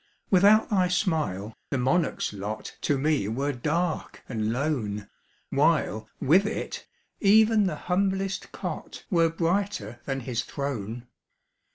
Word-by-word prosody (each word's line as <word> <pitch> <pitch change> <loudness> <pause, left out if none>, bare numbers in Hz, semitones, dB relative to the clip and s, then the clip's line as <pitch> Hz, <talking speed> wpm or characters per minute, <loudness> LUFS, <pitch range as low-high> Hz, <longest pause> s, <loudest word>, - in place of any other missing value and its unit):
Without 205 +4 +5
thy 185 -3 +3
smile, 155 - -1 0.2
the 140 - 0
monarch's 135 0 +1
lot 105 +2 -5
To 145 - +1
me 145 -6 +1
were 135 +7 -1
dark 155 +6 -2
and 110 -3 -1
lone, 115 -7 -2 0.4
While, 110 +1 +2
with 185 +9 +4
it, - - -4 0.3
even 215 0 +5
the 165 - -2
humblest 195 +1 0
cot - - -6
Were 165 -2 +4
brighter 170 - -1
than 135 -1 -2
his 120 -1 -2
throne. 120 -4 -4
150 Hz, 125 wpm, -27 LUFS, 120-185 Hz, 0.4 s, Without